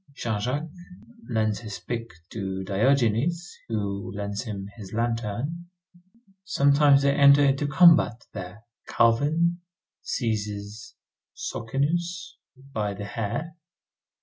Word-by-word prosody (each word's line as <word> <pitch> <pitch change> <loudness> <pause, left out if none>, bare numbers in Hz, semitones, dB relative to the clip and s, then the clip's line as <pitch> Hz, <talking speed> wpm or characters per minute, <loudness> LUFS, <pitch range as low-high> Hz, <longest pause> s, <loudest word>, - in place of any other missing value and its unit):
Jean 110 -5 -2
Jacques 145 +9 -2 0.6
lends 110 -3 0
his 105 -4 -7
pick 115 +5 -5 0.2
to 95 -3 -4
Diogenes, 130 - +1
who 100 -4 -3
lends 100 0 -3
him 100 -5 -6
his 100 -3 -10
lantern. 120 +8 -2 0.8
Sometimes 140 -4 +4
they 140 0 +3
enter 140 0 +6
into 140 +1 +1
combat 155 -6 +5
there. 95 +2 -8 0.2
Calvin 155 +9 +2 0.4
seizes 105 +1 -4 0.4
Socinius 170 +9 -2 0.4
by 105 -2 -2
the 100 +1 -6
hair. 115 +11 -4
115 Hz, 100 wpm, -26 LUFS, 105-145 Hz, 0.8 s, enter